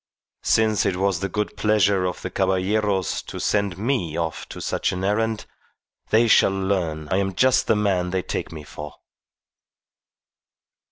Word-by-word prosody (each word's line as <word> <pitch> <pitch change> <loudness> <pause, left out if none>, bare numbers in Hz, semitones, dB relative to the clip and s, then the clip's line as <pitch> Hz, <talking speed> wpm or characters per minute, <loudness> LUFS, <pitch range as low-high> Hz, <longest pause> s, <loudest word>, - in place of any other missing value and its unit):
Since 110 -1 +2
it 95 - 0
was 95 -1 0
the 100 +2 -2
good 105 +3 -2
pleasure 100 -3 +2
of 90 - -4
the 90 - -4
Caballeros 95 0 0
to - - -8
send 100 -4 0
me 100 - -1
off 80 -2 -3
on - - -7
such - - -1
an 90 +1 -4
errand, 110 +2 0 0.6
they 115 +2 +4
shall 110 - +6
learn 95 -6 -1
I 95 - +2
am 95 -1 -1
just 130 +5 +3
the 110 - +4
man 95 -4 +1
they 95 0 -1
take - - -4
me 80 -2 -8
for." 75 +1 -9
95 Hz, 160 wpm, -23 LUFS, 90-105 Hz, 0.6 s, shall